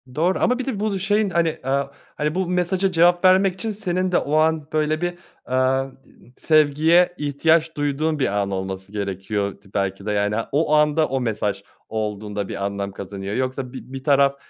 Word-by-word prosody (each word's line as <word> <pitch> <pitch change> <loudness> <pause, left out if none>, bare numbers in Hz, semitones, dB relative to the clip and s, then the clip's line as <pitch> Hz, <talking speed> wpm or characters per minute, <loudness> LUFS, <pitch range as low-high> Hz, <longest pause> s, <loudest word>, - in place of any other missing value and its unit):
Doğru. 175 +4 +1
Ama 250 +1 +2
bir 260 - -3
de 245 -7 -3
bu 205 -2 -1
şeyin, 205 +2 +1
hani, 170 -2 0
aaa, 140 +1 -1 0.2
hani, 150 +2 -1
bu 185 -2 0
mesaja 180 +2 0
cevap 175 +1 +4
vermek 185 0 +5
için 215 +4 -4
senin 185 -3 -2
de - - +3
o 150 +2 -1
an 155 -1 +2
böyle 155 +1 +1
bir, 175 0 -1 0.4
eee, 130 +1 +1 0.5
di - - -24
sevgiye 155 +3 +4
ihtiyaç 160 +3 +1
duyduğun 145 +2 0
bir 135 - +2
an 100 0 -3
olması 95 0 -5
gerekiyor 100 0 -3
t 100 - -20
belki 95 0 -2
de. 105 - -1
Yani, 105 0 0 0.2
o 150 +1 +1
anda 150 +1 +3
o 135 -1 -1
mesaj 105 -4 -2 0.3
olduğunda 105 -2 -3
bir 100 - -4
anlam 100 0 -3
kazanıyor. 100 +1 -6
Yoksa 130 0 -3
bi 130 0 -10
bir 135 -1 -6
taraf, 140 -1 +4
145 Hz, 185 wpm, -22 LUFS, 105-175 Hz, 0.5 s, vermek